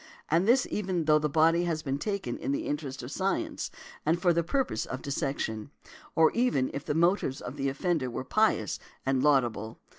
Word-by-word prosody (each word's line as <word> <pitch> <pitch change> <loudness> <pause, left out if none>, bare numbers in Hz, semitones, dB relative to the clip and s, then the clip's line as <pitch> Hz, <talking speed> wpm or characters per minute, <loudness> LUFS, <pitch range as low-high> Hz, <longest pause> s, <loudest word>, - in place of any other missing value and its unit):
And 170 +5 +3
this 250 +3 +5
even 185 -5 -1
though 155 0 +5
the 150 0 0
body 165 +3 +4
has 160 -2 -1
been 140 -1 -2
taken 200 - -2
in - - -2
the 140 - -1
interest 145 -3 -4
of 125 - -7
science, 190 +4 -1 0.3
and 165 +3 +2
for 175 -1 +3
the 170 - +2
purpose 175 - -1
of 130 - -5
dissection; 135 -5 -2 0.5
or 160 -1 +5
even 235 - +1
if 140 - -4
the 145 - -2
motives 170 -5 +2
of 125 - -7
the 140 -1 -1
offender 145 -1 -1
were 120 - -4
pious 130 - +1 0.3
and 135 -1 +2
laudable. 120 -7 +1
150 Hz, 190 wpm, -29 LUFS, 135-175 Hz, 0.5 s, this